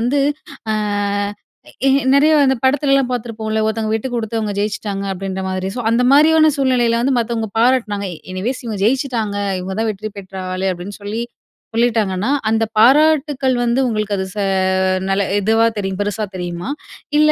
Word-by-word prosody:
வந்து, 255 +5 +1 0.5
அ - - +2 1.1
ஏ - - +6 0.3
நெறைய 300 +3 +5
இந்த 265 -1 +2
படத்துலலாம் 275 -1 +2
பார்த்திருப்போம்ல, 220 -2 -3
'ஒருத்தவங்க 220 0 -1
விட்டுக்குடுத்து 230 -1 -2
அவங்க 210 -2 -2
ஜெயிச்சிட்டாங்க' 200 -1 -3
அப்டின்ற 190 0 -4
மாரி. 185 0 -2
சோ, 245 - -2
அந்த 235 +2 +2
மாரியான 310 +2 +6
சூழ்நிலைல 245 -4 +2
வந்து 260 0 +1
மத்தவங்க 225 -1 -2
பாராட்டுனாங்க. 230 -5 +1 0.3
எனிவேஸ் 235 +9 -3
"இவங்க 210 -3 -4
ஜெயிச்சிட்டாங்க, 235 -4 0 0.2
இவங்கதான் 200 +4 -2
வெற்றி 215 +1 -6
பெற்ற 190 0 -11 0.2
ஆளு" 190 +1 -2
அப்டின்னு 180 +4 -8
சொல்லி, 215 +3 -3 0.5
சொல்லிட்டாங்கன்னா 220 -2 +1 0.2
அந்த 225 0 +2
பாராட்டுக்கள் 280 +1 +4
வந்து 240 +2 +1
உங்களுக்கு 215 -3 -1
அது 190 - -2
ச - - -8 0.7
நல 195 +1 +1 0.2
இதுவா 225 +3 +3
தெரியும் 195 -1 -3
பெருசா 205 +1 -2
தெரியுமா? 175 +1 -4 0.5
இல்ல 305 0 +5
225 Hz, 145 wpm, -18 LUFS, 200-255 Hz, 1.1 s, ஏ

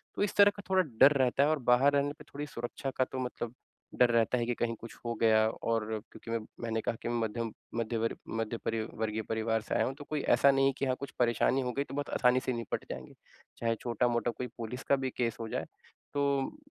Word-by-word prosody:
तो - - -3
इस 205 - -1
तरह 205 0 +7
का 200 - -8
थोड़ा 190 0 +5 0.2
डर 145 - +9
रहता 130 +2 +3
है 150 - +3
और 155 - +1
बाहर 130 +4 +6
रहने 140 0 +2
पे - - -10
थोड़ी 145 +1 -4
सुरक्षा 120 +1 -5
का 130 - +4
तो 130 - -3
मतलब 120 -1 -5 0.5
डर 125 - +6
रहता 115 +2 +3
है 120 - 0
कि 120 - 0
कहीं 115 -1 -1
कुछ 115 - -9
हो 120 - -1
गया 110 -1 +5
और 115 0 -1 0.3
क्योंकि 115 - -9
मैं 115 - +1 0.2
मैंने 115 -1 -1
कहा 115 - -1
कि - - -3
मध्यम 115 -1 -1 0.2
मध्य 115 0 -1
वर्ग 115 +1 -1 0.2
मध्य 115 +1 -2
परी 115 -1 0
वर्गीय 110 0 -2
परिवार 110 0 0
से - - -3
आया - - +3
हूँ 130 - -2
तो 145 - -9
कोई 150 -2 -1
ऐसा 140 - +6
नहीं 135 0 +3
है - - +4
की - - +1
हाँ 130 -1 +1
कुछ 140 - -6
परेशानी 120 +2 +3
हो 125 - -1
गयी 140 - 0
तो - - -10
बहुत 145 0 -2
आसानी 125 0 +4
से 130 - 0
निपट 115 -3 -3
जाएँगे। - - -7 0.4
चाहे 115 -1 0
छोटा-मोटा 120 0 +1
कोई 125 - -5
पुलिस 120 +2 -5
का 140 - +3
भी 135 -1 -2
केस 115 -2 0
हो 115 - -4
जाए - - -2 0.5
तो 140 - 0
120 Hz, 245 wpm, -31 LUFS, 115-135 Hz, 0.5 s, डर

